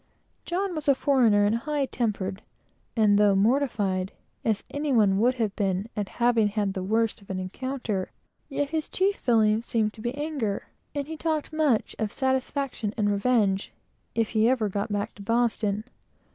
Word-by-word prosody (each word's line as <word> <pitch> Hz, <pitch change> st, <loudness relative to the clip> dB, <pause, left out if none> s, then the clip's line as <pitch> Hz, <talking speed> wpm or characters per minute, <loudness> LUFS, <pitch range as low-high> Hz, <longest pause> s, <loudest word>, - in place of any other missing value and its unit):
John 370 Hz, +2 st, -1 dB
was 310 Hz, -3 st, -3 dB
a 280 Hz, -, +6 dB
foreigner 235 Hz, -7 st, +4 dB
and 205 Hz, -, +2 dB
high 290 Hz, +3 st, -1 dB
tempered, 205 Hz, -6 st, -2 dB, 0.5 s
and, 210 Hz, -3 st, +4 dB
though 205 Hz, -1 st, +5 dB
mortified, 200 Hz, -5 st, +1 dB, 0.3 s
as 220 Hz, -3 st, 0 dB
any 290 Hz, 0 st, -2 dB
one 205 Hz, -5 st, +4 dB
would 250 Hz, +3 st, +3 dB, 0.2 s
be 195 Hz, -1 st, 0 dB
at 205 Hz, -3 st, -2 dB
having 235 Hz, -3 st, +2 dB
had 205 Hz, -1 st, -1 dB
the 190 Hz, -, -3 dB
worst 220 Hz, +3 st, 0 dB
of 200 Hz, -, -19 dB
an 190 Hz, -, -2 dB
encounter, 210 Hz, +1 st, -3 dB, 0.4 s
yet 285 Hz, 0 st, -1 dB
his 315 Hz, -1 st, -2 dB
chief 390 Hz, +2 st, +1 dB
feeling 220 Hz, -2 st, +3 dB
seemed 220 Hz, -2 st, 0 dB
to 220 Hz, -, -10 dB
be 240 Hz, +3 st, -3 dB
anger; 285 Hz, -9 st, -3 dB, 0.3 s
and 285 Hz, -1 st, -1 dB
he 320 Hz, +2 st, -6 dB
talked 315 Hz, -1 st, -2 dB
much 300 Hz, -8 st, +1 dB
of 215 Hz, -2 st, -1 dB
satisfaction 265 Hz, -4 st, -1 dB
and 205 Hz, -2 st, +2 dB
revenge, 205 Hz, -2 st, +1 dB, 0.4 s
if 225 Hz, -2 st, +1 dB
he 220 Hz, +1 st, +3 dB
ever 235 Hz, -5 st, +1 dB
got 200 Hz, +2 st, -3 dB
back 205 Hz, +1 st, -2 dB
to 205 Hz, -, -13 dB
Boston. 220 Hz, -2 st, 0 dB
225 Hz, 170 wpm, -26 LUFS, 205-270 Hz, 0.5 s, a